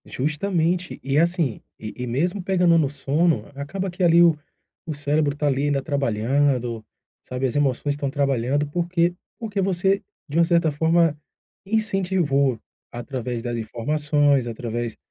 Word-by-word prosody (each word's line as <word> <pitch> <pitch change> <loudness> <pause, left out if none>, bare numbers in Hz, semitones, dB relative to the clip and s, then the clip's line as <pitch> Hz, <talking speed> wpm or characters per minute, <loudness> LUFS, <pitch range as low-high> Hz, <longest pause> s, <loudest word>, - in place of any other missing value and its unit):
Justamente. 170 +4 -1
E 135 +1 0
assim, 165 - +1 0.2
e 110 -1 -7
e 125 0 -5
mesmo 175 +11 -1
pegando 180 -2 +3
no 150 -4 +2
sono, 145 +4 0
acaba 185 +8 -4
que 180 +1 -3
ali 170 0 +6
o 165 -3 +4 0.5
o 155 - -3
cérebro 145 0 0
tá 150 - -1
ali 140 -1 +1
ainda 145 -1 +1
trabalhando, 130 -3 0 0.4
sabe, 125 +1 -3
as 130 - -2
emoções 145 0 +1
estão 145 -1 -3
trabalhando 140 0 0
porque 175 +2 0 0.3
porque 210 -4 -2
você, 195 +1 +1 0.3
de 150 +2 -3
uma - - +6
certa 170 -2 +2
forma, 160 +1 +2 0.5
incentivou 185 - +1 0.3
através 120 -1 -5
das 120 -1 -3
informações, 145 +3 +1
através, 115 0 -4
145 Hz, 145 wpm, -23 LUFS, 130-170 Hz, 0.5 s, ali